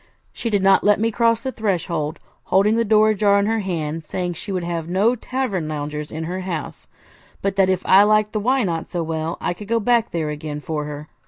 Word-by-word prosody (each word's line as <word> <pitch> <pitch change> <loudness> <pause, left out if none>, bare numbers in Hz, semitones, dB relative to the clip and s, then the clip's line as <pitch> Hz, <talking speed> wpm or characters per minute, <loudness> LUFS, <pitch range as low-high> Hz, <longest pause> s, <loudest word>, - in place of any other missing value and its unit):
She 230 - -3
did 205 -3 +1
not 195 0 +5
let 205 0 +4
me 225 +1 +1
cross 230 0 +2
the 260 - -3
threshold, 170 -8 -2 0.3
holding 205 +3 +3
the 230 - +2
door 215 0 +4
ajar 200 -1 +3
in 200 - +2
her 225 +1 +1
hand, 165 -7 -2
and 165 - -9
saying 175 +3 -3
she 195 +5 -7
would 185 -2 -2
have 170 -1 -3
no 205 +7 +2
tavern 230 -9 -3
loungers 150 0 -4
in 160 +1 -4
her 180 +3 -4
house, 180 -5 -5 0.6
but 195 0 0
that 190 -1 +4
if 185 -1 0
I 190 - +7
liked 215 0 +3
the 215 - 0
Why 255 +4 +2
Not? 165 -4 -2
so 175 -2 -2
well, 160 +1 -3
I - - -1
could 205 +3 -10
go 230 +1 +1
back 235 +1 +2
there 160 -3 -2
again 150 0 -5
for 150 -1 -4
her. 150 0 -7
190 Hz, 235 wpm, -21 LUFS, 160-215 Hz, 0.6 s, I